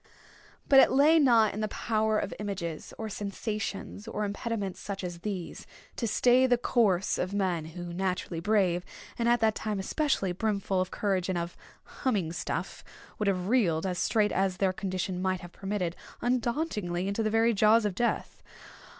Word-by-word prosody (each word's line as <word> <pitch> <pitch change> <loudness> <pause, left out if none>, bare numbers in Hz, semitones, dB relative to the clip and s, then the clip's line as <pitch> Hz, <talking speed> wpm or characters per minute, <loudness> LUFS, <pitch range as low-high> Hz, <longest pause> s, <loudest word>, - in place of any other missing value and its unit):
But 270 - +7
it - - +6
lay 300 +5 +5
not 235 -7 +5
in 210 - -5
the 215 - 0
power 215 0 0
of - - -2
images, 185 -6 -4
or 220 - -4
sensations, 210 0 -4
or 210 -2 -2
impediments 205 -1 -3
such 195 -1 -5
as 175 -1 -5
these, 185 -3 -5 0.3
to 235 - -2
stay 250 +4 +4
the 245 -1 +4
course 205 -7 +2
of 185 +3 -2
men 180 -5 0
who, 175 +1 -7
naturally 180 -2 -2
brave, 180 -2 +2 0.4
and 235 0 +2
at 240 0 +3
that 220 -1 +4
time 215 -1 -3
especially, 200 - 0
brimful 195 -1 0
of 185 - -2
courage 190 -3 -1
and 185 - 0
of 170 0 -4 0.3
"humming 200 - -2
stuff," 175 +1 -4 0.4
would 210 - 0
have 185 -2 0
reeled, 195 -9 +2
as 180 -1 -2
straight 210 +2 +2
as 190 -1 0
their 190 -1 +1
condition 185 -1 -3
might 185 -1 0
have 175 - -10
permitted, 195 -3 -3 0.2
undauntedly 235 - -1
into 200 +3 -1
the 215 - +1
very 225 +2 +3
jaws 215 +2 +4
of 205 - 0
Death. 235 +5 -2
200 Hz, 175 wpm, -29 LUFS, 185-225 Hz, 0.4 s, But